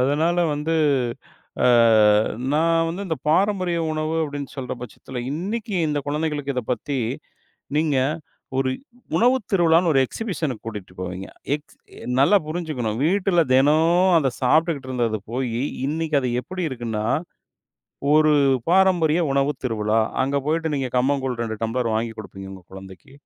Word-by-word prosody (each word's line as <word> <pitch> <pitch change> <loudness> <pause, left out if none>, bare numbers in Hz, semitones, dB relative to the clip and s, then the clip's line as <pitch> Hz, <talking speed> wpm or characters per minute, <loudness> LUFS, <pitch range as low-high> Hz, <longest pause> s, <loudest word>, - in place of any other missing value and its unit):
அதனால 155 +6 +2 0.2
வந்து 150 +3 -2 0.9
அ - - +6 0.9
நான் 165 +1 +2
வந்து 180 +5 -4
இந்தப் 160 -6 -4
பாரம்பரிய 185 0 +2
உணவு 155 +1 -2
அப்படின்னு 145 -2 -6
சொல்ற 130 -2 -4
பட்சத்துல, 125 +1 -8
இன்னைக்கு 205 +7 -4
இந்த 150 -1 -1
குழந்தைகளுக்கு 150 -2 -2
இதப் 125 -1 -3
பத்தி 140 +2 -2 0.8
நீங்க, 150 -3 +2 0.6
ஒரு 130 -1 +1 0.5
உணவு 250 +3 +4 0.2
திருவிழான்னு 170 -1 +4
ஒரு 135 - +4
எக்ஸிபிஷன்க்கு 165 - -4
கூட்டிட்டு 105 -5 -7
போவீங்க. 95 +1 -5 0.3
எக்ஸ் 150 0 -9 0.4
நல்லா 200 +9 +5
புரிஞ்சுக்கணும், 155 -10 -3
வீட்டுல 185 -2 +2
தெனோம் 165 +7 +4
அத 135 -4 0
சாப்ட்டுக்கிட்டு 150 0 +2
இருந்தது 115 -4 -1
போயி, 125 -1 -2 0.2
இன்னைக்கு 155 -1 0
அது 125 -2 -1
எப்படி 185 -1 -5
இருக்குன்னா, 115 -4 -3 1.1
ஒரு 155 0 +5 0.4
பாரம்பரிய 175 -3 +3
உணவு 140 +1 +2
திருவிழா. 110 -2 0 0.2
அங்க 140 +2 -1
போயிட்டு 160 +1 0
நீங்க 135 -2 -1
கம்பங்கூழ் 130 -2 0
2 110 -1 -3
டம்ளர் 115 0 -1
வாங்கி 115 0 -2
குடுப்பீங்க 95 -2 -9
உங்க 95 -1 -11
குழந்தைக்கு. 95 +6 -12
145 Hz, 130 wpm, -22 LUFS, 125-165 Hz, 1.1 s, அ